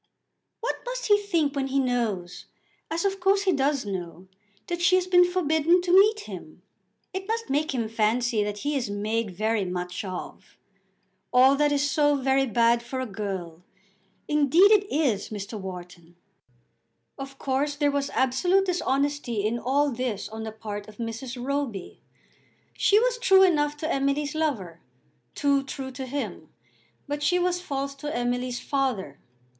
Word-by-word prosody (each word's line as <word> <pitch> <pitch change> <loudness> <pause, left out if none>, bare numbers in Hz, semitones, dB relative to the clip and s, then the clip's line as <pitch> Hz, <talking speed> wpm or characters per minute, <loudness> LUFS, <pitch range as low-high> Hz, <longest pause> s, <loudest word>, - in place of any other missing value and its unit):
"What 470 - -2
must - - -4
he 415 0 +6
think 335 -8 0
when 270 -1 -1
he 270 +1 -1
knows, 230 -9 -2 0.4
as 335 +3 -2
of 390 0 0
course 390 +2 +3
he 380 - +3
does 280 -4 +1
know, 185 -2 -6 0.4
that 345 0 -4
she 355 +1 +5
has 370 -1 +2
been 360 -1 +6
forbidden 330 0 +3
to 355 - -1
meet 420 +3 +6
him? - - -10 0.5
It 380 +1 -5
must 455 -6 -2
make 300 +3 +1
him 230 -3 -1
fancy 225 0 +1
that 205 0 -4
he 295 0 0
is 250 -6 -1
made 215 +2 -1
very 215 +3 0
much 180 0 -4
of. 185 -2 -8 0.7
All 260 +2 +6
that 295 +1 +2
is 285 0 +2
so 290 0 +3
very 270 0 +2
bad 235 0 +3
for 250 +2 -5
a 260 - -2
girl! 195 -6 -5 0.7
Indeed 300 +7 +5
it 405 -1 +3
is, 265 -10 0
Mr. 210 0 -6
Wharton." 180 -2 -9 1.0
Of 275 0 -8
course 275 +2 -1
there 290 -1 +1
was 280 0 -1
absolute 355 +10 +2
dishonesty 280 - -1
in 230 +2 0
all 280 +4 +1
this 235 -4 -3
on 220 +1 -7
the 220 - -5
part 210 -2 -7
of 210 -1 -14
Mrs. 235 +2 -5
Roby. 260 -7 -4 0.7
She 410 - +3
was - - +1
true 385 -5 +6
enough 295 -5 +2
to 315 +2 -2
Emily's 280 +2 0
lover, 230 - -2 0.6
too 280 -1 +2
true 270 -1 -6
to 260 0 -6
him; 225 - -5 0.6
but 290 +1 -3
she 360 +4 +2
was 355 0 0
false 275 -5 -3
to 295 +2 -6
Emily's 245 0 -1
father. 250 - -2
270 Hz, 160 wpm, -26 LUFS, 220-310 Hz, 1.0 s, he